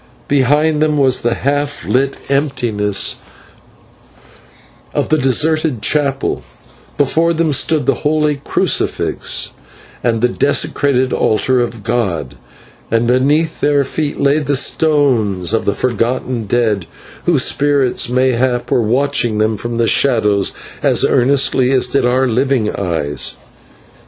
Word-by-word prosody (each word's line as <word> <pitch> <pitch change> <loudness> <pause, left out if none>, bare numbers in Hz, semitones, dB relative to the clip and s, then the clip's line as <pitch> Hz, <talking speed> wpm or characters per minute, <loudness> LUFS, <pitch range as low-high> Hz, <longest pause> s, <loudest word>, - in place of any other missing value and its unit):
Behind 150 +3 +2
them 155 -1 +1
was 130 -2 +1
the 120 0 0
half 145 +1 -2
lit 135 +2 0
emptiness 120 -8 0 1.8
of - - -1
the 155 - +3
deserted 150 -1 +1
chapel, 140 -1 0 0.6
before 160 +4 +1
them 160 -1 0
stood 150 +1 +1
the - - +3
holy 150 -1 +1
crucifix - - -1 0.5
and 115 -2 +1
the 125 - +4
desecrated 130 0 0
altar 125 +4 +1
of 115 -3 -3
God, 95 - -2 0.6
and 115 +1 +1
beneath 145 +6 +1
their 145 -1 +2
feet 145 +2 -3
lay 140 +2 +2
the 140 -2 0 0.2
bones 115 - +1
of 115 - 0
the 100 - 0
forgotten 120 0 -2
dead, 105 -6 0 0.4
whose 160 -7 +3
spirits 140 -4 +1
mayhap 125 -1 0
were - - +3
watching 120 -1 0
them 110 +1 +1
from 120 +3 -5
the 115 0 +1
shadows 105 -6 +2 0.3
as - - +2
earnestly 130 0 +2
as 130 -2 +3
did 140 -3 +1
our 130 +2 +2
living 125 -2 0
eyes. 80 -7 -3
130 Hz, 125 wpm, -15 LUFS, 115-145 Hz, 1.8 s, the